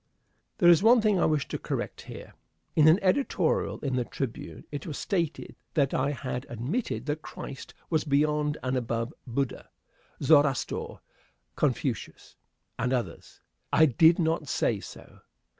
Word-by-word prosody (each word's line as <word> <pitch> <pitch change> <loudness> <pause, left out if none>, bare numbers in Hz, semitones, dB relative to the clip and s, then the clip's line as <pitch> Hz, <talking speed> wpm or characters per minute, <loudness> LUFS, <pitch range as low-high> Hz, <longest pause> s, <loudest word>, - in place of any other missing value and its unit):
There 175 - +4
is 170 -1 +7
one 235 +3 +6
thing 210 -4 +2
I - - +3
wish 150 -3 0
to - - -3
correct - - -4
here. - - -9 0.4
In 155 -1 +6
an 160 +3 +7
editorial 190 - +1
in 135 -3 -1
the 125 - +1
Tribune 130 -2 -6
it 145 +1 -6
was 150 - -5
stated 170 -5 -2 0.2
that 140 -4 +2
I 135 +2 +1
had 130 -2 -4
admitted 120 - -3
that 150 +1 -2
Christ 135 -3 -9 0.2
was 160 -2 +2
beyond 150 +1 +1
and 130 0 -1
above 115 +1 -2
Buddha, 130 +2 -3 0.5
Zoroaster, 145 -3 +2 0.5
Confucius, - - -2 0.4
and 125 +1 0
others. 120 -10 -4 0.3
I 160 - +6
did 160 +5 +5
not 160 -2 0
say 110 - 0
so. - - -12
145 Hz, 145 wpm, -28 LUFS, 130-160 Hz, 0.5 s, is